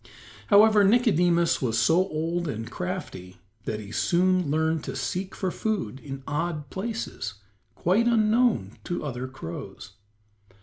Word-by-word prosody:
However, 210 0 +6
Nicodemus 180 - +3
was 115 -4 0
so 165 +7 +4
old 165 +2 -2
and 115 -5 -5
crafty 175 - -6 0.3
that 105 - -3
he 105 -1 -9
soon 180 +3 +2
learned 160 +1 +1
to - - -5
seek 180 +8 -3
for 190 -2 -2
food 185 - -2
in 135 -2 -8
odd 150 -1 -3
places 200 - -4 0.4
quite 205 +7 +2
unknown 220 - +2
to 175 -3 -3
other 130 -2 -4
crows. 85 -11 -8
170 Hz, 130 wpm, -26 LUFS, 135-195 Hz, 0.4 s, However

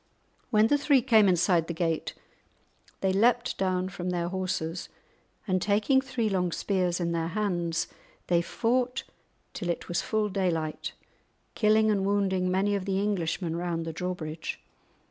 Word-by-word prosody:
When 215 -3 +4
the 290 +6 +3
three 280 -3 +4
came 220 -6 +5
inside 175 -2 +3
the 170 - -4
gate, 165 -1 -1 0.9
they 190 -1 +2
leapt 235 +4 +3
down 185 -1 0
from 180 -1 -4
their 175 -1 -1
horses, 180 -2 -3 0.6
and 185 -2 +1
taking 215 +7 +3
three 255 -4 -2
long 180 -3 0
spears 180 -1 0
in 170 -1 -1
their 165 -1 -1
hands, 170 -3 -1 0.4
they 170 -1 +3
fought 245 +7 0 0.5
till 180 - -4
it 170 - -2
was 175 - 0
full 215 -1 0
daylight, 170 -5 -2 0.6
killing 215 0 +3
and 200 -2 +1
wounding 195 -2 +1
many 195 +3 +1
of 195 -2 -1
the 195 -1 0
Englishmen 180 -4 -1
round 170 -1 -2
the 165 - -4
drawbridge. 165 -2 -4
185 Hz, 150 wpm, -28 LUFS, 170-210 Hz, 0.9 s, came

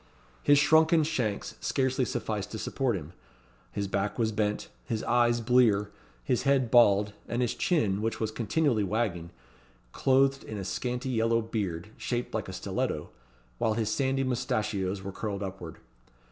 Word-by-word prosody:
His 145 0 +5
shrunken 160 +2 +5
shanks 125 -10 -2
scarcely 130 -1 +1
sufficed 110 -6 -3
to - - -3
support 125 +1 -1
him; 80 -2 -7 0.6
his 100 -1 -2
back 100 +1 -1
was 115 -2 +1
bent; 105 -1 -1 0.2
his 110 -2 -3
eyes 120 0 +2
blear; 110 -4 +3 0.3
his 120 - +1
head 135 -4 +2
bald; 105 -4 +5
and 120 +1 0
his 120 - 0
chin, 105 - +1
which 115 +1 -2
was 110 -1 -1
continually 115 +1 +1
wagging, 100 -5 -1 0.6
clothed 135 - +2
with 110 - -6
a 95 - -5
scanty 125 +5 -3
yellow 115 -1 +2
beard, 105 -5 -3
shaped 120 0 -3
like - - -3
a - - -6
stiletto, - - -3 0.5
while 110 -1 +1
his 110 -1 -1
sandy 135 +1 +1
moustachios 105 -6 -1
were 100 - -5
curled 100 0 -4
upward. 95 -4 -7
115 Hz, 155 wpm, -29 LUFS, 100-130 Hz, 0.6 s, His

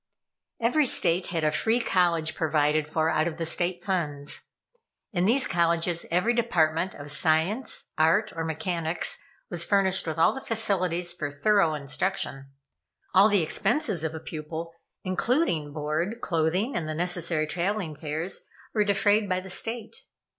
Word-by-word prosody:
Every 260 +5 +2
State 175 -4 +3
had 165 -2 -2
a 155 - +3
free 225 +9 +1
college 170 -7 +1
provided 155 -1 +1
for 160 +1 +1
out 155 +2 +1
of 165 -2 -4
the 165 - -2
State 175 +2 -1
funds. 150 -7 -1 0.6
In 180 -2 +1
these 250 +5 +3
colleges 170 -1 +1
every 180 +8 +2
department 180 -7 +1
of 145 0 -4
Science, 160 - 0
Art, 170 +7 +3
or 165 - -2
Mechanics 165 +1 -2 0.3
was 170 -1 +2
furnished 190 -2 +1
with 160 - -3
all 165 - +4
the 265 - -6
facilities 185 -7 0
for 155 -5 -4
thorough 165 +2 +2
instruction. 140 -1 -3 0.6
All 195 +3 +6
the 200 -5 +3
expenses 205 - 0
of 160 0 -3
a - - -5
pupil, 160 +1 -6 0.3
including 185 - 0
board, 155 +9 -2
clothing, 180 - 0
and 160 -3 -2
the 155 - -3
necessary 170 -2 0
traveling 175 0 -2
fares, 160 +4 -4 0.3
were 210 - +3
defrayed 205 +1 +2
by 185 0 +1
the 190 0 -8
State. 225 +2 -3
175 Hz, 150 wpm, -26 LUFS, 160-200 Hz, 0.6 s, All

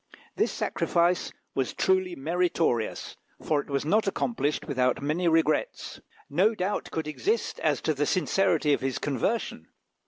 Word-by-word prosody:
This - - +1
sacrifice 175 +1 +1 0.2
was 135 -2 -1
truly 185 -1 +1
meritorious, 165 -6 -1 0.2
for 150 -2 0
it - - -16
was 140 0 -1
not 210 +6 +2
accomplished 190 - -1
without 125 -1 +1
many 155 +5 0
regrets. 160 -1 0 0.3
No 190 +10 +2
doubt 195 +1 -2
could 160 -2 -3
exist 410 - -1
as - - +1
to 155 - +1
the 145 0 -1
sincerity 180 -5 +2
of - - 0
his 135 -1 -1
conversion. 140 - -2
160 Hz, 145 wpm, -27 LUFS, 140-185 Hz, 0.3 s, not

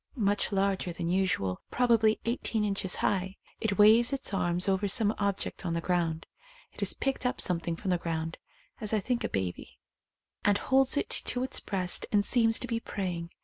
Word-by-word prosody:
Much 205 -4 +1
larger 195 -2 0
than 170 0 -4
usual, 175 - 0
probably 230 -3 +3
eighteen 230 -2 -1
inches 195 -2 0
high. 190 -1 -1 0.2
It 205 -3 -1
waves 220 +4 +6
its 270 -6 0
arms 175 -1 +1
over 195 +1 +1
some 210 +2 +3
object 200 -1 -1
on 170 -2 -2
the - - 0
ground. 165 -2 -1 0.5
It - - -15
has - - 0
picked 270 -1 -2
up 250 - -1
something 170 -1 -1
from 190 +2 -3
the 180 - +1
ground 165 -1 -4 0.4
(as 215 0 -3
I 215 - +3
think 240 +4 -2
a - - -1
baby) 95 -2 -4 0.7
and 205 0 +3
holds 265 +4 +2
it - - -1
to 250 0 -1
its 260 - 0
breast 185 -3 0
and 205 -1 +3
seems 225 -1 +4
to 250 - -4
be 230 -1 -1
praying. 180 -6 -4
200 Hz, 190 wpm, -29 LUFS, 175-225 Hz, 0.7 s, waves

